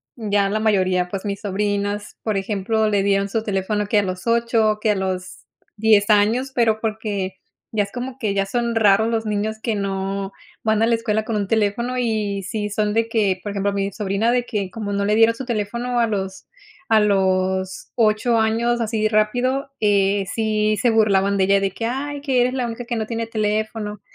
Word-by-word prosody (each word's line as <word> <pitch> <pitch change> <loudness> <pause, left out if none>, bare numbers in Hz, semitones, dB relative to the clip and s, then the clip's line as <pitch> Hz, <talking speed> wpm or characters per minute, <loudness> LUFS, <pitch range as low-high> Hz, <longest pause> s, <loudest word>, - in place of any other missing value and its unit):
ya 205 -4 0
la 215 +1 0
mayoría, 185 -4 +1
pues 195 +1 -5
mis 200 -1 -3
sobrinas, 205 0 -2
por 215 -3 0
ejemplo, 215 +2 0
le 200 -2 +1
dieron 200 0 +1
su 220 +1 -1
teléfono 205 +1 -1
que 210 0 +3
a - - +1
los 185 -1 -5
8 230 -2 +2
que 215 - +2
a - - +1
los 185 -1 -4 0.3
10 215 -1 +3
años, 225 +6 +3
pero 225 -3 +2
porque 210 -4 -3 0.4
ya 215 -2 +1
es 200 - -9
como 250 +1 -5
que 210 -3 -1
ya 195 0 0
son 235 +3 -1
raros 220 0 +4
los 225 -1 -1
niños 210 +1 -1
que 225 -2 -1
no 195 0 -3 0.3
van 220 0 +2
a 225 - +4
la 235 - +3
escuela 220 -1 -1
con 220 0 -3
un 200 -1 -1
teléfono, 225 +4 0
y 210 -4 -1
sí 210 +1 -3
son 210 0 0
de 225 0 +1
que, 205 -5 +1
por 205 - -4
ejemplo, 200 0 -1
mi 200 0 -1
sobrina 210 +3 0
de 245 -1 +1
que 200 -6 -3
como 210 -2 -5
no 200 0 0
le 210 +1 +2
dieron 225 +1 +5
su 265 - -6
teléfono 235 +2 -2
a 230 - +3
los 190 -2 -4 0.5
a 220 - +6
los 190 -2 0
8 225 +1 +2
años 230 +2 +1
así 220 -1 0
rápido, 245 +6 +1
eh, 200 -1 +2
sí 215 -1 +1
se 245 - +3
burlaban 200 -3 +3
de 190 - +3
ella 200 +1 +4
de 195 0 0
que 225 - -4
ay, 280 +4 -3
que 265 -4 +1
eres 250 +1 +1
la 250 -2 -1
única 235 +1 -5
que 240 -1 -3
no 220 -1 -2
tiene 230 0 -3
teléfono. 215 -1 -2
215 Hz, 205 wpm, -21 LUFS, 200-225 Hz, 0.5 s, a